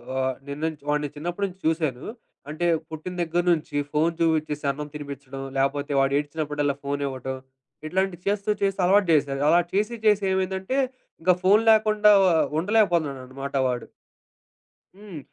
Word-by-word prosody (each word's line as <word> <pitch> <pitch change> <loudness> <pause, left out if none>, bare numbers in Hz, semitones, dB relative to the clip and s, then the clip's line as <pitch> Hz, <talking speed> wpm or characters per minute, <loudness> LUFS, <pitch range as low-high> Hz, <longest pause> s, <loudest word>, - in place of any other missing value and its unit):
ఆహ్, 130 0 0
నిన్నంచి 150 +1 -4
వాడిని 150 -1 0
చిన్నప్పటి 175 +6 -3
నుంచి 190 0 -13
చూశాను. 155 -6 -1 0.4
అంటే 155 +3 -3 0.2
పుట్టిన 160 +3 -6
దగ్గర 170 +1 0
నుంచి 155 -2 -4 0.2
ఫోను 160 +2 +1
చూపిచ్చేసి 155 -3 0
అన్నం 150 +2 -6
తినిపిచ్చడం, 140 -2 -7 0.2
లేపోతే 140 +2 0
వాడు 135 0 +2
ఏడ్చినప్పుడల్లా 145 -1 -2
ఫోనివ్వటం. 135 -2 -3 0.5
ఇట్లాంటివి 185 0 -1
చేస్తూ, 200 +1 0
చేస్తూ 195 0 0
అలవాటు 195 0 +4
చేశారు. 140 -2 +1
అలా 175 - +6
చేసి 210 +4 0
చేసి 210 -2 +4
ఏమైందంటే, 190 +6 -1 0.4
ఇంక 180 +2 +4
ఫోను 205 +4 +5
లేకుండా 215 -1 +4
వ - - +5 0.3
ఉండలేకపోతున్నాడనమాట 145 - 0
వాడు. 125 -2 -2 1.1
హ్మ్. 200 -6 -9
160 Hz, 135 wpm, -25 LUFS, 140-190 Hz, 1.1 s, అలా